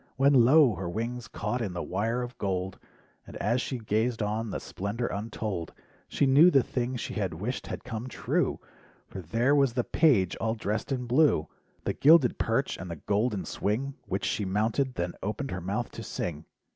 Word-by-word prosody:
When 140 +2 +5
lo! 130 +1 +6
her 90 -1 -4
wings 115 +4 -4
caught 110 +5 -3
in 100 -5 -3
the 90 - -3
wire 115 +6 -1
of 120 0 -7
gold: 95 -1 -2 0.5
And - - -10
as 120 +5 +1
she 130 - -3
gazed 110 +1 0
on 110 +2 -2
the - - -3
splendor 105 +5 -4
untold— 100 -5 -4 0.3
She - - +1
knew 140 +6 +7
the 135 -7 +4
thing 125 0 -2
she 120 - -4
had 95 -7 -2
wished 110 +10 -4
had - - -6
come 115 +1 -5
true, 125 - -1 0.5
For 95 - -8
there 115 - +1
was 140 -4 +3
the 125 0 0
"page" 115 - +3
all 110 0 -1
dressed 105 +2 -3
in 125 -2 -1
blue. 125 - +3 0.4
The - - -1
gilded 150 -4 +5
perch, 115 +5 0
and 95 - -7
the 85 - -4
golden 105 - -1
swing, 125 +7 -2
Which 95 +1 -2
she 105 - -1
mounted, 110 +7 0
then 85 0 -2
opened 110 +7 -3
her 90 - -4
mouth 100 +7 -3
to - - -8
sing. 80 -2 -4
115 Hz, 190 wpm, -28 LUFS, 100-125 Hz, 0.5 s, knew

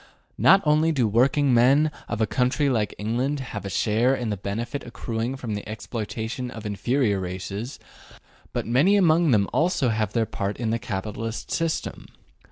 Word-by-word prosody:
Not 195 +1 +6
only 155 +2 +3
do 135 -6 +1
the 110 - +2
working 130 +5 +3
men 135 +6 +4 0.2
of 115 -1 -3
a - - +4
country 130 +6 +1
like 110 -4 -1
England 125 +7 -1
have 115 -6 -6
a - - -3
share 115 +7 +2
in 120 -4 -3
the - - 0
benefit 115 +8 -4
accruing 115 +1 -4
from 120 -5 -5
the 105 0 -5
exploitation 110 +2 -4
of 115 -3 -9
inferior 105 +1 0
races, 95 +6 -5 0.7
but - - -2
many 140 - +4
among 170 -4 +4
them 105 -6 +3
also 165 -6 +2
have 110 -2 -1
their 115 -1 +2
part 100 -2 -3
in 115 -2 -1
the 115 - 0
capitalist 110 +3 -5
system. 165 -1 -2
115 Hz, 175 wpm, -24 LUFS, 105-135 Hz, 0.7 s, Not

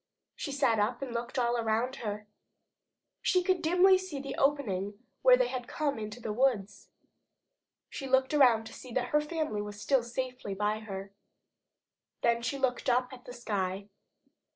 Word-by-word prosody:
She 285 - -4
sat 265 -6 +2
up 235 +5 0
and 255 -3 -5
looked 235 +2 -4
all 240 -1 +2
around 230 +3 0
her. 210 -3 -4 1.0
She 365 -2 +2
could 370 0 +2
see - - -11
dimly 360 +4 +5
the 285 -8 -5
opening 205 -9 0 0.2
where - - +7
they - - +3
had 250 -1 -4
come 290 -6 -1
into 215 +2 -6
the 220 -2 -4
woods. 230 -5 0 1.0
She 270 - -6
looked 265 +2 +2
around 245 -6 +5
to 220 - -10
see 255 - -10
that 245 0 -1
her 300 - +3
family 300 -8 -2
was 205 0 -7
still 270 +4 +2
safely 250 -3 -4
by 210 +2 0
her. 195 -2 -7 1.1
Then 235 0 +3
she 275 +4 -2
looked 260 -1 0
up 250 +1 +1
at 250 -1 -12
the 245 - -8
sky. 200 -4 -3
245 Hz, 170 wpm, -30 LUFS, 215-275 Hz, 1.1 s, where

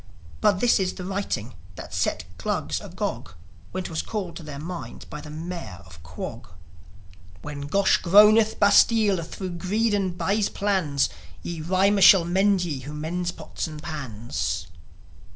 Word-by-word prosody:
But 205 -3 +3
this 240 -3 +4
is 185 -1 0
the 180 - -7
writing 185 - -3 0.2
that - - -9
set - - 0 0.2
Glugs - - -2
agog - - -5 0.4
When 185 0 -3
'twas 165 -2 -3
called 195 -6 -5
to - - -8
their 150 -3 -8
minds 150 -5 -7
by 150 - -8
the 150 - -10
Mayor 160 - -7
of 85 -3 -15
Quog: 80 0 -7 1.0
When 140 -1 -6
Gosh 195 +6 +3
groaneth 210 +4 +5
bastlie 205 0 +5
thro 185 +3 -6
Greed 200 +6 0
and 190 -3 -1
bys 205 +2 +1
plannes 185 -9 0 0.3
Ye 170 -2 -5
rimer 190 +4 +2
shall 185 -2 +8
mende 190 +2 +2
ye 150 -6 -3
who 145 +4 -8
mendes 175 +4 -2
pottes - - -6
and 155 -1 -8
pans. 105 - -4
175 Hz, 150 wpm, -25 LUFS, 150-200 Hz, 1.0 s, shall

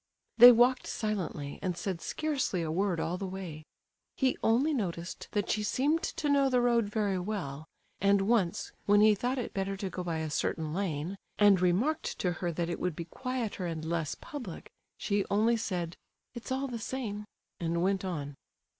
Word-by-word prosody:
They 245 +1 +13
walked 245 +2 +4
silently, 185 -10 -3
and 180 -3 -2
said 180 -1 -3
scarcely 280 - -1
a 155 - -2
word 185 0 0
all 175 +3 -2
the 195 - -3
way. 180 -5 -7 0.5
He 260 -2 +2
only 260 +8 +3
noticed 175 -8 -3
that 205 -2 0
she 215 - 0
seemed 285 +9 +1
to 300 - -2
know 280 -1 +4
the 250 -1 +3
road 240 -2 +3
very 205 -2 0
well; 165 -7 -4 0.3
and 200 +1 +4
once, 200 -5 +1 0.2
when 205 0 +6
he 215 0 +7
thought 245 +6 -1
it 250 - -4
better 195 0 -2
to 190 -1 -4
go 180 - -4
by 170 -2 -2
a 160 -1 -3
certain 155 +1 -1
lane, 180 0 -2 0.2
and 205 -3 +6
remarked 210 - +1
to 180 - 0
her 175 +1 -2
that 170 +1 -2
it 170 - -3
would 180 -3 -1
be 170 - -5
quieter 230 -2 -3
and 160 -2 -4
less 165 -2 -1
public, 245 - -8 0.3
she 200 -1 0
only 220 +4 +3
said, 175 -6 -3 0.4
"it's 240 +1 -8
all 265 +1 0
the 240 -3 -5
same," 220 -3 -4 0.3
and 170 0 0
went 195 0 +1
on. 150 -6 -4
195 Hz, 185 wpm, -30 LUFS, 170-235 Hz, 0.5 s, They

